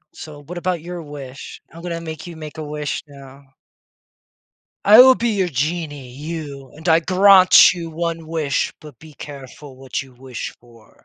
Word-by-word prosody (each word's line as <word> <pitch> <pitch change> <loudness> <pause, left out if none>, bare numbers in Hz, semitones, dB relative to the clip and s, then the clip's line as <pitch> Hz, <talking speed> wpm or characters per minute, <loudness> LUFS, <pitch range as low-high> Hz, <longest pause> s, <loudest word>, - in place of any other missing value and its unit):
So, 145 -2 -11
what 175 +5 -9
about 180 -1 -2
your 175 +1 -7
wish? 140 -3 -10
I'm 165 +1 -12
gonna 170 -1 -4
make 160 0 -8
you 170 - -9
make 155 -1 -9
a 155 - -4
wish 150 0 -4
now. 140 -1 -14 1.4
I 215 +4 +9
will 260 0 +9
be 235 -1 -1
your 195 -4 0
genie, 145 -1 -3
you, 140 0 -7
and 160 +3 -7
I 160 0 +5
grant 185 +1 +6
you 165 -2 -6
1 165 0 -4
wish, 155 -4 -1
but 150 -6 -13
be 155 -1 -14
careful 140 -1 -11
what 135 -1 -5
you 135 -2 -12
wish 130 -1 -7
for. 115 -2 -22
155 Hz, 175 wpm, -20 LUFS, 140-170 Hz, 1.4 s, I